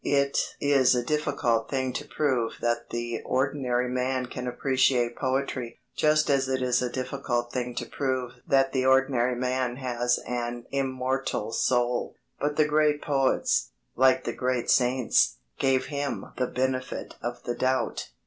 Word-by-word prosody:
It 140 -1 +1
is 135 -3 +4
a 120 - 0
difficult 140 -6 0
thing 130 -2 -1
to 145 +3 -5
prove 130 -7 0
that 120 0 -1
the 120 -1 -3
ordinary 130 -2 0
man 130 +1 -1
can 125 0 -6
appreciate 125 -1 +1
poetry, 130 -3 -2 0.2
just 155 0 +3
as 135 -2 +2
it 130 -1 0
is 125 -1 +2
a 125 - -1
difficult 125 -2 -2
thing 125 -1 -3
to - - -3
prove 130 -3 -2 0.2
that 135 -1 +3
the 130 -1 0
ordinary 130 -2 +3
man 125 0 -1
has 125 -2 0
an 120 -1 -3
immortal 130 -4 -1
soul. 120 0 0 0.2
But 145 0 -1
the 155 - +4
great 150 0 +2
poets, 135 -2 +1 0.3
like 130 +1 +4
the - - -3
great 125 -2 0
saints, 125 - +3 0.2
gave 130 -1 +2
him 140 0 -3
the 125 0 0
benefit 130 0 -2
of 120 0 -5
the 120 - -2
doubt. 130 +1 -1
130 Hz, 150 wpm, -27 LUFS, 120-135 Hz, 0.3 s, is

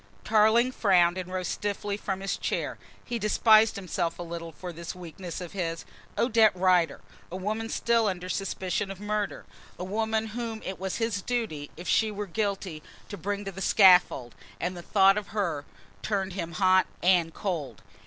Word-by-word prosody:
Tarling 220 +3 +4
frowned 180 -7 +3
and 185 0 -6
rose 185 -1 -2
stiffly 205 0 -2
from 195 -2 -4
his 195 - -1
chair. - - -3 0.3
He 240 -2 -3
despised 215 +1 +5
himself 175 -3 -2
a 175 - -5
little 170 -1 -6
for 175 +3 -8
this 170 +1 -7
weakness 175 0 -7
of 180 -2 -7
his. 170 -4 -3 0.3
Odette 225 -4 +4
Rider! 180 -2 +2 0.3
A - - -5
woman 215 +4 -3
still 230 -1 +2
under 185 -2 -3
suspicion 190 +1 -2
of 195 -1 -7
murder, 210 0 -3 0.3
a - - -5
woman 220 +3 -1
whom 230 -2 -4
it 190 - -5
was 190 0 -3
his 225 -4 -1
duty, 200 -12 -3
if 175 - -8
she 220 - +3
were 210 0 -4
guilty, 195 -4 -3 0.3
to - - -5
bring 200 +2 -3
to 195 - -4
the 190 +1 -8
scaffold, 180 - +5 0.3
and 180 +2 -2
the 175 - -7
thought 195 +2 +4
of 210 - -11
her 165 -8 -1 0.4
turned 195 -3 -1
him 170 -3 -4
hot 185 -1 +4 0.2
and 175 -3 +3
cold! 155 - -4
195 Hz, 175 wpm, -27 LUFS, 175-210 Hz, 0.4 s, despised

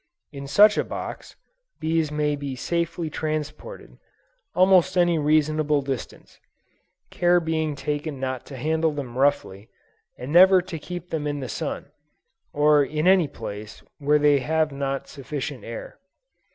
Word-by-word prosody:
In 140 -2 -8
such 205 +9 +5
a - - +2
box, - - -7 0.4
bees 160 -1 0
may 150 0 0
be 140 -2 -5
safely 170 +4 -2
transported, 155 - -5 0.6
almost 185 0 +4
any 175 -2 +3
reasonable 150 -1 +2
distance: 135 -3 -7 0.7
care 175 0 +3
being 160 -2 -2
taken 145 0 -4
not 130 -2 -3
to 135 - -9
handle 160 +4 +1
them 135 -5 -6
roughly, 130 -7 0 0.5
and 125 +3 -7
never 185 +2 +8
to 180 -2 -6
keep 175 +2 -8
them 150 -2 -2
in 145 0 -3
the 130 - -5
sun, - - -5 0.6
or 150 0 +4
in 150 +3 -2
any 185 -4 +5
place 105 -4 -8 0.2
where 150 +1 +3
they 145 -1 +4
have 155 +3 0
not 135 -1 -3
sufficient 140 0 -6
air. - - -8
150 Hz, 140 wpm, -24 LUFS, 140-165 Hz, 0.7 s, never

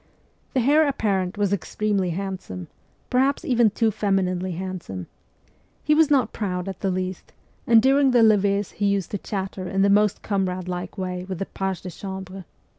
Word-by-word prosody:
The 260 - +3
heir 295 +5 +4
apparent 200 -8 -1
was 205 -1 +1
extremely 200 0 -1
handsome 185 - -5 0.4
per 250 - +3
haps, 270 +2 +1
even 240 -3 +4
too 220 +2 +1
femininely 185 -3 0
handsome. 175 - -5 0.8
He 300 - +3
was 315 0 +4
not 275 -4 +2
proud 180 -3 -3
in 195 - -2
the 195 - -1
least, 185 0 -4 0.3
and 230 -1 +6
during 270 +1 +4
the 245 -2 +5
levees 205 -2 +3
he 205 - -1
used 200 -3 0
to 205 - -2
chatter 190 -2 -4
in 195 0 +1
the 200 - +4
most 210 -1 +3
comradelike 185 -2 -2
way 180 -1 -3
with 190 - -3
the 195 - -3
pages 190 -2 -3
de 185 - -5
cham 190 +2 -6
bre. 190 +1 -10
195 Hz, 180 wpm, -24 LUFS, 185-215 Hz, 0.8 s, and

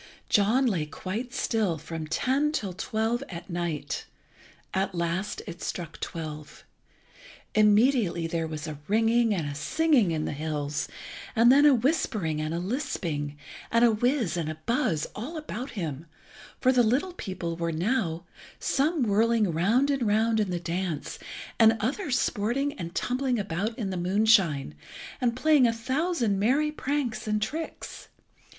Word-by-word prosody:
John 220 +6 +3
lay 175 -11 0
quite 215 +10 -5
still 220 -9 0
from 160 +1 -6
ten 265 - +1
till 205 -12 -2
twelve 220 +6 -1
at 175 0 -8
night. 170 -3 -3 0.7
At 190 0 -1
last 170 +4 -2
it 170 - -8
struck 165 -3 -5
twelve. 155 -2 -7 0.9
Immediately 210 -4 +4
there 165 0 -2
was 155 -1 -5
a 155 -3 -6
ringing 225 +2 +3
and 175 -7 0
a 145 - -4
singing 250 - +2
in 155 -2 -1
the - - -2
hills, 150 0 -3 0.5
and 235 +2 +6
then 285 +2 +7
a 285 - +6
whispering 215 - 0
and 155 0 -2
a 165 - -1
lisping, 170 - -3 0.3
and 230 +1 +4
a 235 - +5
whiz 240 - +1
and 160 -2 -2
a 155 - -5
buzz 230 - +1
all 275 +10 -6
about 270 -4 -5
him, 160 -3 -4 0.5
for 255 - +4
the 250 -1 +4
little 260 +11 +1
people 185 - -4
were 170 0 -2
now, 170 -1 -1 0.3
some 295 +1 +1
whirling 220 -1 +2
round 225 - +2
and 270 -5 0
round 220 +2 +2
in 210 -3 +1
the 175 -1 -1
dance, 170 -2 -3 0.4
and 225 0 +6
others 255 - 0
sporting 245 +9 0
and 170 0 -7
tumbling 255 0 0
about 205 +3 -2
in 205 -6 -2
the 185 - -3
moonshine, 185 - +3 0.5
and 240 -2 +1
playing 280 -1 +4
a - - +3
thousand 250 - 0
merry 275 +9 +2
pranks 280 -7 -2
and 215 0 +1
tricks. 310 +10 -5
210 Hz, 155 wpm, -27 LUFS, 170-250 Hz, 0.9 s, then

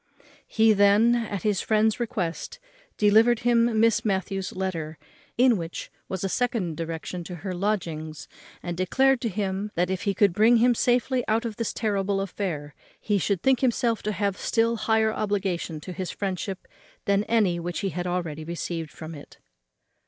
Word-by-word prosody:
He 220 0 +4
then, 205 +3 +5
at 220 -5 -2
his 210 -3 +1
friend's 220 +1 +2
request, 215 - -3 0.4
delivered 220 +3 +4
him 235 -1 +3
Miss 230 0 +3
Matthews's 195 -2 -1
letter, 165 -5 -3 0.4
in 245 -2 +5
which 165 -1 -6 0.2
was 190 -1 -3
a - - +1
second 215 -6 -1
direction 165 +2 -5
to 180 - -6
her 185 - -2
lodgings, 170 -6 -3 0.4
and 175 -1 -3
declared 265 +9 +2
to 230 - -1
him 200 0 -2
that, 180 +2 +1
if 190 - -2
he 200 -1 -1
could 200 -2 +3
bring 220 +5 +5
him 245 +2 +4
safely 250 +2 +1
out 225 +2 +1
of 225 -3 -4
this 230 - -1
terrible 200 -2 -1
affair, 175 -7 -4 0.3
he 205 -2 0
should 190 -1 -1
think 265 -2 +4
himself 240 -3 +1
to 210 - -2
have 200 -2 -1
a - - -14
still 230 0 +1
higher 220 0 +1
obligation 190 -7 -2
to 185 - -7
his 185 +1 -4
friendship 190 -1 -4 0.4
than 200 0 +2
any 205 -7 +2
which 175 +3 -4
he 195 - -1
had 180 0 -4
already 170 -4 -3
received 165 -1 -4
from 160 +2 -9
it. 145 -2 -12
200 Hz, 175 wpm, -26 LUFS, 180-225 Hz, 0.4 s, then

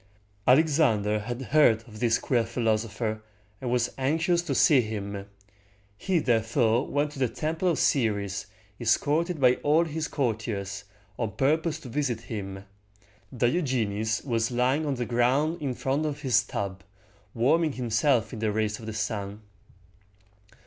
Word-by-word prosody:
Alexander 125 -8 +3
had 120 +3 -5
heard 125 -4 +3
of 110 -2 -11
this 115 -1 +2
queer 120 -3 +1
philosopher, 110 -1 -1 0.4
and 125 - -3
was 120 -1 +1
anxious 160 +6 +1
to 155 -6 -3
see 135 0 +5
him. 100 -3 -5 0.7
He 180 - 0
therefore 115 -2 +2
went 145 +1 0
to 145 - -10
the 130 - +2
Temple 155 +9 -2
of 170 - +2
Ceres, 100 -7 0 0.3
escorted 160 +3 +1
by 125 -2 +4
all 155 +3 +2
his 160 0 -3
courtiers, 105 -6 -3 0.3
on 110 -4 -2
purpose 155 +6 +1
to 130 - -9
visit 125 -3 -1
him. 95 -4 -6 0.7
Diogenes 120 - 0
was 115 -4 0
lying 130 +5 +1
on 140 - 0
the 120 -1 -2
ground 135 +8 +1
in 135 -4 -2
front 140 +5 -1
of 150 0 -5
his 125 -3 +4
tub, 100 -4 -5 0.5
warming 150 +6 +2
himself 125 0 +1
in 110 - -5
the 110 -1 0
rays 110 0 -1
of 110 - -9
the 110 - -4
sun. 105 -1 -4
120 Hz, 145 wpm, -27 LUFS, 110-145 Hz, 0.7 s, see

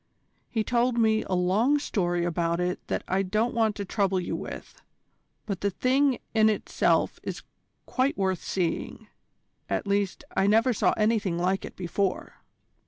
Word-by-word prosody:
He 220 -2 0
told 240 +1 +1
me 220 -1 +3
a - - -3
long 205 +11 +3
story 175 -10 -1
about 170 0 0
it 180 +1 -1
that - - -2
I 190 +1 +1
don't 215 +5 0
want 220 -3 +1
to 200 - -4
trouble 195 -1 +1
you 180 - -3
with: - - -8 0.6
but 200 -4 -4
the 200 - +1
thing 260 +5 +2 0.2
in 220 -1 +5
itself 215 - +1
is - - -6 0.4
quite 265 +2 0
worth 190 -2 0
seeing. 180 -3 -3 0.6
At - - -1
least, 200 -1 -1
I 195 - +3
never 225 +4 +4
saw - - +2
anything 215 -5 +1
like 185 +2 0
it - - -10
before." 185 +1 -2
200 Hz, 160 wpm, -27 LUFS, 185-225 Hz, 0.6 s, in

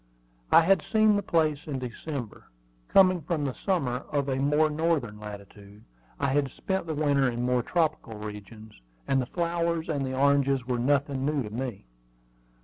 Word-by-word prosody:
I - - +8
had 195 +4 +3
seen 215 -1 +3
the 205 - +1
place 160 -6 0
in 140 -3 -3
December, 125 0 -6 0.4
coming 185 -2 +5
from 155 -1 -2
the 135 - -2
summer 140 -11 -1
of 140 -2 0
a 130 - 0
more 150 +3 +3
northern 150 -8 -1
latitude. 105 0 -11 0.4
I - - +1
had 140 0 +1
spent 190 +2 -3
the 160 - -2
winter 140 -3 +2
in 120 0 -3
more 125 0 +2
tropical 155 -6 -1
regions, 105 +1 -9 0.3
and 135 -1 +2
the 125 - -4
flowers 170 0 -1
and 145 -3 -1
the 130 0 -3
oranges 140 -2 +2
were 125 -1 -1
nothing 140 +1 +1
new 145 -1 0
to 105 - -7
me. 120 - -5
140 Hz, 170 wpm, -27 LUFS, 125-160 Hz, 0.4 s, I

